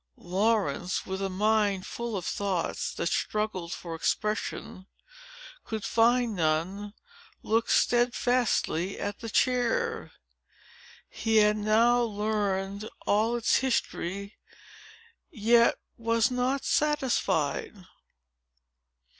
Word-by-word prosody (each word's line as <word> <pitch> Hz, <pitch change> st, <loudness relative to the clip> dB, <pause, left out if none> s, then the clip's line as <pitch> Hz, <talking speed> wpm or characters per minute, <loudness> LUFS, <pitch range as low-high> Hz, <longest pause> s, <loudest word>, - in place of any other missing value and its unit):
Laurence, 185 Hz, -3 st, 0 dB
with 190 Hz, 0 st, -4 dB
a 195 Hz, -, -1 dB
mind 205 Hz, 0 st, +1 dB
full 235 Hz, -3 st, -4 dB
of 180 Hz, -, -5 dB
thoughts, 195 Hz, -4 st, -2 dB
that -, -, -4 dB
struggled 185 Hz, -1 st, -2 dB
for 170 Hz, -2 st, -6 dB
expression, 195 Hz, +2 st, -3 dB
but -, -, -18 dB
could 220 Hz, -2 st, -3 dB
find 235 Hz, 0 st, +2 dB
none, 180 Hz, +6 st, -1 dB, 0.5 s
looked 225 Hz, +1 st, +1 dB
steadfastly 240 Hz, -6 st, +1 dB
at 205 Hz, 0 st, -4 dB
the 230 Hz, -, -6 dB
chair. 450 Hz, -, 0 dB, 1.0 s
He 225 Hz, -1 st, 0 dB
had 210 Hz, 0 st, +5 dB
now 225 Hz, +3 st, +3 dB
learned 205 Hz, -2 st, -2 dB, 0.2 s
all 220 Hz, +3 st, +2 dB
its 240 Hz, -1 st, +2 dB
history, 200 Hz, -6 st, -2 dB, 0.9 s
yet 230 Hz, +2 st, +3 dB, 0.2 s
was 230 Hz, +1 st, +1 dB
not 250 Hz, +2 st, 0 dB
satisfied. 250 Hz, -, 0 dB
215 Hz, 95 wpm, -28 LUFS, 195-240 Hz, 1.0 s, had